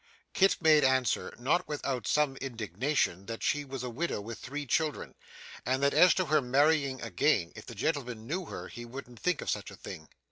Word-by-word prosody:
Kit 195 0 +4
made 155 -2 +6
answer, 130 -3 +2
not 150 +9 +1
without 140 -4 -3
some 150 -3 +2
indignation, 115 - -1
that 115 0 -5
she 145 0 +1
was 135 -2 -6
a 125 - -3
widow 160 +1 -2
with 115 +2 -7
three 145 +3 -5
children, 155 +3 -1 0.5
and 130 +2 0
that 140 - +3
as 180 - +7
to 185 - +1
her 155 -1 +3
marrying 140 +1 +2
again, 90 - +1
if - - -11
the - - -8
gentleman 125 -8 -2
knew 180 +8 -3
her - - -7
he 120 - -8
wouldn't 120 -1 -9
think 180 -3 0
of - - -4
such - - -3
a - - -11
thing. 80 -1 -9
135 Hz, 200 wpm, -30 LUFS, 120-150 Hz, 0.5 s, as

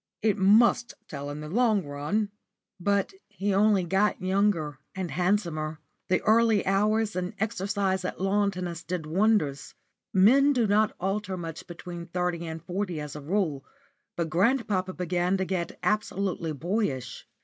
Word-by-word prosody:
It 215 -2 +3
must 220 +4 +4
tell 140 -6 -6
in 145 +1 -6
the 150 - -6
long 215 0 +2
run." 150 +9 -2 0.5
But 200 - +1 0.2
he 200 +1 -2
only 200 -1 +4
got 195 +4 +1
younger 185 -7 0 0.2
and 185 -3 -3
handsomer. 170 -5 0 0.3
The 185 - +2
early 225 -1 +4
hours 210 +3 +1
and 180 0 -3
exercise 200 -3 -1
at 180 - -4
lawn 200 +2 +2
tennis 180 -3 -5
did 175 -2 -4
wonders. 170 -4 +1 0.4
Men 265 +10 +5
do 245 -4 +2
not 210 +1 +2
alter 195 0 -2
much 165 -2 -7
between 175 0 -8
thirty 175 -1 -2
and 160 0 -6
forty 180 -1 -3
as 150 -1 -6
a 150 - -6
rule, 155 -4 -1 0.5
but 165 -2 -2
grandpapa 190 -1 +1
began 180 +1 0
to 190 - -1
get 175 -2 -3
absolutely 195 -5 -1
boyish. 150 - -2
190 Hz, 150 wpm, -27 LUFS, 170-205 Hz, 0.5 s, Men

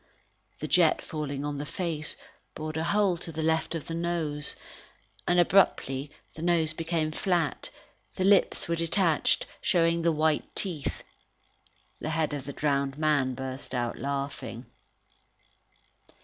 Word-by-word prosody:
The - - -2
jet 340 - +4
falling 145 -3 -4
on 145 -1 -3
the 145 - -3
face, 160 -4 -3 0.4
bored 155 0 -4
a 160 +1 -1
hole 200 -2 +3
to 165 - -7
the 160 0 -3
left 160 +1 +1
of 160 - -4
the 165 - -5
nose. 165 -3 -2 0.7
And, 175 0 +4
abruptly, 150 -7 +3 0.2
the 155 - -9
nose 165 -2 +2
became 165 -1 -1
flat, 170 -1 0 0.5
the 185 - -1
lips 195 0 +4
were 170 - +1
detached, 165 -1 +2 0.2
showing 170 -1 +3
the 165 0 +3
white 155 -1 +1
teeth. 170 -8 -2 1.0
The 155 - -3
head 155 -1 0
of 140 -2 -4
the 140 - -5
drowned 140 -1 0
man 145 -4 +2
burst 130 0 -6
out 120 -1 -2
laughing. 140 -3 -4
155 Hz, 140 wpm, -28 LUFS, 145-170 Hz, 1.0 s, jet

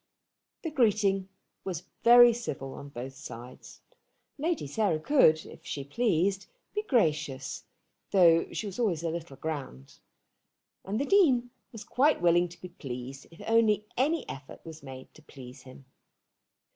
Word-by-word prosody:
The 325 - -3
greeting 205 - +2 0.3
was 180 -4 -4 0.2
very 240 0 +8
civil 135 - -5
on 140 - -9
both 130 0 -7
sides. 125 -2 -11 0.6
Lady 325 - -1
Sarah 165 +2 0
could, 160 - +4
if - - -13
she 140 - -5
pleased, 195 - 0 0.3
be 420 - -1
gracious, 155 - -1 0.4
though 170 -4 +4
she - - -4
was 200 +2 -6
always 180 -9 0
a 165 - -1
little 165 -4 -6
grand; 135 - -6 0.8
and 205 +4 -3
the 280 - 0
Dean 270 -11 +3 0.2
was 225 -3 -9
quite 290 +4 +2
willing 175 0 +3
to 170 - -14
be 180 - -9
pleased, 135 -4 -8
if 165 - -15
only 220 -2 +3
any 300 +5 0
effort 135 +4 -10
was 160 -1 -10
made 130 -1 -11
to - - -17
please 130 -4 -12
him. 130 +1 -14
175 Hz, 145 wpm, -29 LUFS, 140-230 Hz, 0.8 s, very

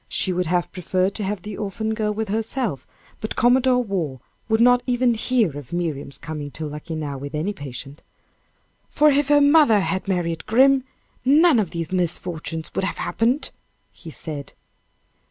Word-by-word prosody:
She 185 - 0
would 180 -1 -1
have 175 -1 0
preferred 185 +1 -1
to 210 - -4
have 195 -1 -3
the 210 -1 -6
orphan 220 +2 -3
girl 215 -1 -1
with 215 0 -3
herself, 220 - -2 0.3
but 215 - -4
Commodore 250 +1 +3
Waugh 175 - -3 0.3
would 220 0 +2
not 245 +1 +5
even 245 -1 +2
hear 225 - +1
of 145 -4 -9
Miriam's 160 -5 -3
coming 150 -3 -6
to 160 - -4
Luckenough 150 -1 -5
with 145 +2 -6
any 170 +7 -1
patience 140 -2 -8 0.9
"For 300 0 +4
if 285 0 +2
her 290 0 +5
mother 285 -7 +5
had 190 0 -2
married 170 -4 -2
'Grim,' 265 +3 +4 0.4
none 295 0 +5
of 200 -6 0
these 165 0 -5
misfortunes 170 -2 -2
would - - -1
have 195 - -2
happened," 245 +6 0 0.4
he 165 - -12
said. 150 -2 -7
195 Hz, 165 wpm, -22 LUFS, 160-240 Hz, 0.9 s, not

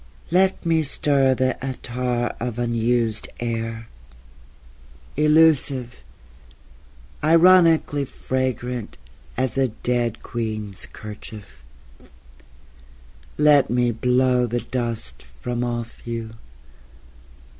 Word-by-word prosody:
Let 190 +1 +2
me 165 -1 +3
stir 140 -2 +2
the 130 +1 -1
attar 125 -2 -2
of 120 -1 -4
unused 115 -1 0
air, 115 -1 -3 1.3
Elusive... 150 -5 +3 1.2
ironically 165 -3 +5
fragrant 125 -3 -3 0.4
As 130 0 0
a 135 - +3
dead 120 0 -2
queen's 110 -4 -5
kerchief... 105 - -10 1.8
Let 150 -2 +5
me 120 0 +2
blow 125 +1 +2
the 120 +1 -2
dust 115 - -4 0.2
from 120 0 -2
off 120 -1 -5
you... 115 -1 -4
125 Hz, 80 wpm, -22 LUFS, 115-135 Hz, 1.8 s, ironically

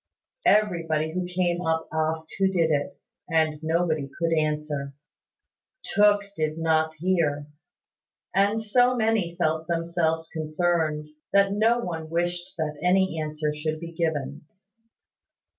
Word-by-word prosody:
Everybody 165 -7 +2
who 180 0 -2
came 180 -1 0
up 160 -1 0
asked 160 0 -1
who 195 - +4
did 170 -4 +1
it; 145 +5 -1 0.3
and 160 -2 +2
nobody 160 -3 0
could 165 -1 +1
answer. 150 -2 -1 0.9
Tooke 205 0 +4
did 155 -1 -1
not 160 -1 +1
hear; 155 -4 0 0.9
and 200 +3 +3
so 245 +3 +3
many 220 -7 +1
felt 160 -2 0
themselves 165 -1 0
concerned, 155 -1 -1 0.2
that 200 0 +5
no 225 +3 +3
one 165 -8 -4
wished 175 +2 -2
that 150 -2 -3
any 180 -2 +2
answer 150 0 -2
should 155 +1 -3
be 170 0 -7
given. 150 -4 -2
165 Hz, 125 wpm, -26 LUFS, 155-180 Hz, 0.9 s, that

